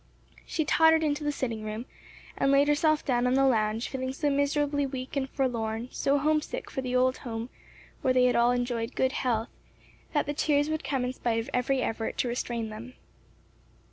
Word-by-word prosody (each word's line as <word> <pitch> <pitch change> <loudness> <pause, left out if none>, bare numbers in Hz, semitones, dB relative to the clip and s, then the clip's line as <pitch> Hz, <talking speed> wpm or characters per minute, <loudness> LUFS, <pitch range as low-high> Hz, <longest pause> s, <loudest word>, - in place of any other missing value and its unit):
She 315 - -1
tottered 320 +1 +5
into 300 0 0
the 295 - 0
sitting 230 -6 -3
room 215 +3 -5 0.5
and 275 - +2
laid 280 +1 +5
herself 305 +1 +2
down 250 -2 +2
on 250 - +2
the 270 0 +4
lounge 220 -2 +1
feeling 260 -1 -3
so 290 +1 0
miserably 285 0 +1
weak 260 -1 -5
and 270 -1 -1
forlorn, 235 -3 -2
so 280 +1 +1
homesick 310 - -1
for 265 - -3
the 255 -1 -3
old 255 +1 +3
home 230 0 -6 0.5
where 260 - +2
they 255 0 +4
had 250 - +3
all 235 +1 +4
enjoyed 245 -1 -1
good 260 0 +2
health, 235 -4 -1 0.6
that 295 - +2
the 290 - -2
tears 295 0 +1
would 315 - -2
come 265 -3 -1
in 250 - -2
spite 235 -3 -1
of 225 - -5
every 255 +1 +1
effort 225 0 -3
to - - 0
restrain 235 -2 -3
them. 230 +4 -9
260 Hz, 195 wpm, -28 LUFS, 240-285 Hz, 0.6 s, tottered